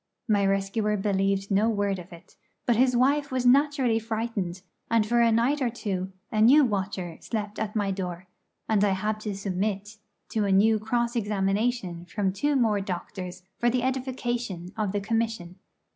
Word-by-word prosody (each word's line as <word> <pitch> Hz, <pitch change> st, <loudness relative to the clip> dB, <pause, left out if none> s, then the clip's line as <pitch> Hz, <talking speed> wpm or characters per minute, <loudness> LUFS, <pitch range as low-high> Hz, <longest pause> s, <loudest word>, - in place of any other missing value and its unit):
My 205 Hz, -3 st, +3 dB
rescuer 195 Hz, +2 st, 0 dB
believed 195 Hz, 0 st, 0 dB
no 205 Hz, +3 st, +3 dB
word 200 Hz, -3 st, 0 dB
of 180 Hz, +1 st, -11 dB
it; 170 Hz, 0 st, -14 dB, 0.3 s
but 240 Hz, -, +3 dB
his 250 Hz, +1 st, +3 dB
wife 280 Hz, +3 st, +2 dB
was 255 Hz, -1 st, -1 dB
naturally 265 Hz, -3 st, +4 dB
frightened, 220 Hz, -5 st, -3 dB, 0.3 s
and 225 Hz, -2 st, +3 dB
for 235 Hz, +2 st, +2 dB
a 230 Hz, -1 st, +4 dB
night 245 Hz, +6 st, +2 dB
or 250 Hz, -, +2 dB
two 190 Hz, -5 st, -3 dB, 0.2 s
a 215 Hz, -2 st, +1 dB
new 275 Hz, +6 st, +7 dB
watcher 190 Hz, -5 st, -3 dB
slept 210 Hz, -2 st, -4 dB
at 215 Hz, 0 st, -3 dB
my 205 Hz, -2 st, +1 dB
door, 180 Hz, -2 st, -5 dB, 0.4 s
and 210 Hz, -2 st, +2 dB
I 200 Hz, -2 st, +3 dB
had 210 Hz, +3 st, -1 dB
to 210 Hz, -2 st, -4 dB
submit 200 Hz, +2 st, -3 dB, 0.3 s
to 215 Hz, -2 st, 0 dB
a 200 Hz, -, +1 dB
new 215 Hz, +3 st, +4 dB
cross 235 Hz, +2 st, -1 dB
examination 200 Hz, -3 st, -1 dB
from 190 Hz, +1 st, -1 dB
two 290 Hz, +9 st, 0 dB
more 220 Hz, -6 st, +2 dB
doctors 185 Hz, -1 st, -6 dB, 0.2 s
for 240 Hz, -, +3 dB
the 245 Hz, 0 st, 0 dB
edification 245 Hz, -8 st, -2 dB
of 215 Hz, -3 st, -1 dB
the 205 Hz, 0 st, -1 dB
Commission. 220 Hz, -4 st, -2 dB
210 Hz, 175 wpm, -27 LUFS, 195-235 Hz, 0.4 s, new